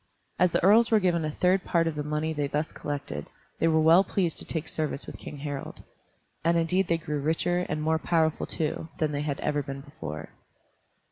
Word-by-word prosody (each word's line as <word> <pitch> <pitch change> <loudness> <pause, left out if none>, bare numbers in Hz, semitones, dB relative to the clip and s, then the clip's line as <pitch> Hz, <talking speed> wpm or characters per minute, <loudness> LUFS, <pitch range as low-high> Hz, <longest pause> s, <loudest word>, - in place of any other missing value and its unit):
As 180 -1 +4
the - - +1
earls 220 +5 +6
were 220 - +5
given 175 -4 +1
a 155 - -1
third 185 +4 +2
part 170 -1 +2
of 165 - 0
the 150 - -3
money 150 +2 -1
they 145 -2 -1
thus 150 +3 -2
collected, 140 - -5 0.3
they 165 - +3
were 160 -1 +4
well 165 +4 +6
pleased 180 -5 0
to - - -2
take 160 -1 -3
service 155 -2 -2
with - - -9
King 150 - -8
Harald. 145 -1 -6 0.6
And 170 +1 +3
indeed 180 +3 +2
they 170 - +2
grew 150 -2 -3
richer, 175 +4 0
and 150 0 -2
more 160 +1 +2
powerful 160 -2 +1
too, 160 +1 -3
than 155 -2 0
they 145 -1 -2
had 145 -2 -2
ever 150 -1 0
been 135 0 -6
before. 80 - -7
160 Hz, 210 wpm, -27 LUFS, 150-170 Hz, 0.6 s, earls